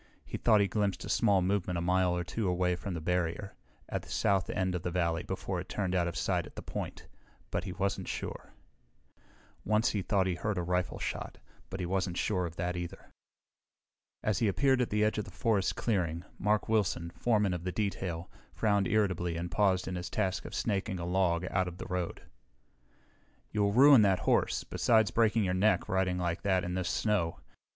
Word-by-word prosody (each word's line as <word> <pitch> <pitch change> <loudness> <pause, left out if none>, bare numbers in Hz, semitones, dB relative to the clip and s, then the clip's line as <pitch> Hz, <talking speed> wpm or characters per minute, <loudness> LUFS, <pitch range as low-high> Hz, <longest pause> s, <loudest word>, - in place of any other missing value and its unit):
He - - -6
thought 110 -3 +5
he 100 - +3
glimpsed 100 -2 -1
a - - -7
small 100 -5 +3
movement 90 -2 0
a - - 0
mile 90 0 +2
or 90 - -1
two 105 +4 -2
away 90 0 +1
from 90 +1 -5
the - - -3
barrier, 90 +3 -1 0.3
at - - -3
the - - -15
south 95 -2 +1
end 95 -1 0
of 90 - -2
the 90 - -2
valley 85 -2 0
before 95 -1 -3
it 90 - -7
turned 95 -3 -2
out 90 -2 +2
of 85 - -4
sight - - 0
at - - -16
the - - -7
point, - - -6 0.5
but 90 - -2
he 95 - -4
wasn't 100 +1 -2
sure. - - -5 1.1
Once 110 +2 +2
he 105 - -1
thought 95 0 +1
he 95 - 0
heard 105 +3 -2
a 90 - 0
rifle 90 +1 -1
shot, - - -4 0.3
but 95 - -5
he 90 - -2
wasn't 95 -1 -1
sure 90 -4 0
of 85 - -10
that, 90 +1 -2
either. 85 -1 -7 1.1
As 105 -4 +1
he 115 - +2
appeared 130 +5 +3
at 125 - 0
the 105 0 +1
edge 105 0 +1
of 105 - -3
the - - -10
forest 105 -5 0
clearing, 85 -7 -1 0.2
Mark 105 +1 +1
Wilson, 95 -6 0
foreman 105 -2 +1
of 85 -1 -4
the 90 - -2
detail, 90 -5 -2 0.3
frowned 100 -3 +2
irritably 90 -5 +1
and 85 0 -4
paused 95 -1 +2
in 95 - -3
his 90 0 -4
task 95 -3 -1
of - - -6
snaking 100 -2 -1
a 85 - -3
log 90 -1 +1
out 95 -1 +2
to 90 - -4
the - - -6
road. 90 -2 -3 1.3
"You'll 100 -1 +2
ruin 135 +2 +8
that 95 -3 +3
horse, - - +2
besides 110 -3 +2
breaking 115 -1 +3
your 90 -2 0
neck, 95 0 +2
riding 95 -1 +1
like 90 0 -1
that 95 -2 +1
in 90 - -3
this 90 -1 -1
snow. 100 -7 0
95 Hz, 205 wpm, -31 LUFS, 90-105 Hz, 1.3 s, ruin